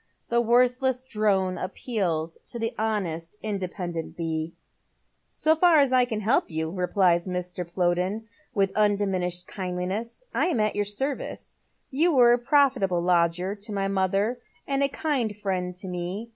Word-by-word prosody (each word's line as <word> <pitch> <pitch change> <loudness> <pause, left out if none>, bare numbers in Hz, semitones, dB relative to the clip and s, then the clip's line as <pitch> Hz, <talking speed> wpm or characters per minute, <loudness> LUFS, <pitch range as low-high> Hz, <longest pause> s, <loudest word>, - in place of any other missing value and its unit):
The 235 0 +3
worthless 250 +2 +2
drone 195 -6 0
appeals 185 -5 -2
to 240 - -7
the 225 +1 -2
honest, 200 -6 -2
independent 180 -5 -4
bee." 165 -1 -3 0.4
" - - -47 0.2
So 315 +1 +5
far 330 -1 +5
as 275 -2 +3
I 250 -1 +5
can 220 -3 -3
help 225 +6 +2
you," 160 -1 -2
replies 180 -1 +2
Mr. 180 -1 -4
Plowden, 180 +4 0 0.3
with 195 -2 +2
un 210 -1 +4
diminished 180 -3 -1
kindliness, 190 - -4
"I - - +2
am 325 -10 0
at 215 0 +1
your 205 0 0
service. 265 +7 -4 0.4
You 315 +4 +3
were 240 -2 +7
a 245 - +2
profitable 245 -10 +2
lodger 175 +1 +2
to 210 +1 -6
my 195 -1 -1
mother, 195 +5 0 0.3
and 275 0 0
a 280 - +3
kind 260 -9 -1
friend 185 -3 -2
to 190 +1 -6
me. 180 +5 -4
200 Hz, 160 wpm, -26 LUFS, 180-240 Hz, 0.4 s, were